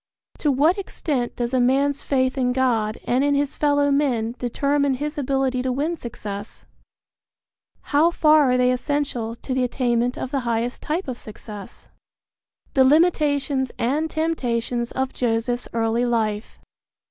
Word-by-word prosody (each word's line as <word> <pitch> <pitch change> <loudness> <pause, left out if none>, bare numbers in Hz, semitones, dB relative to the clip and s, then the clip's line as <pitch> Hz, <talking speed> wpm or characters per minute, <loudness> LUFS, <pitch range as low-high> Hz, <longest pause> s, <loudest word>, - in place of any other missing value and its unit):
To 295 - +2
what 310 +9 +3
extent 285 -10 -3
does 240 +1 -3
a 260 - +3
man's 275 +3 +2
faith 260 -2 0
in 250 -2 +1
God 230 -5 +1
and 255 +3 +1
in 285 0 +2
his 285 0 0
fellow 285 -1 +2
men 250 -6 +1
determine 280 +3 +1
his 295 +3 -4
ability 270 -2 0
to 260 0 -1
win 295 +7 -1
success? 215 -6 -7 1.3
How 305 +4 +5
far 305 -4 +4
are 250 - +3
they 250 0 +3
essential 250 -3 -2
to 255 +2 -5
the 260 0 +1
attainment 245 -1 0
of 255 - -4
the 275 - 0
highest 235 0 -2
type 330 +4 -2
of 250 -2 -5
success? 210 -1 -10
II. - - -38 0.7
THE 265 - +5
LIMITATIONS 285 -3 +2
AND 295 +7 0
TEMPTATIONS 245 -7 -1
OF 265 0 -2
JOSEPH'S 240 0 -1
EARLY 230 +1 0
LIFE. 220 -2 -1
260 Hz, 150 wpm, -23 LUFS, 240-285 Hz, 1.3 s, How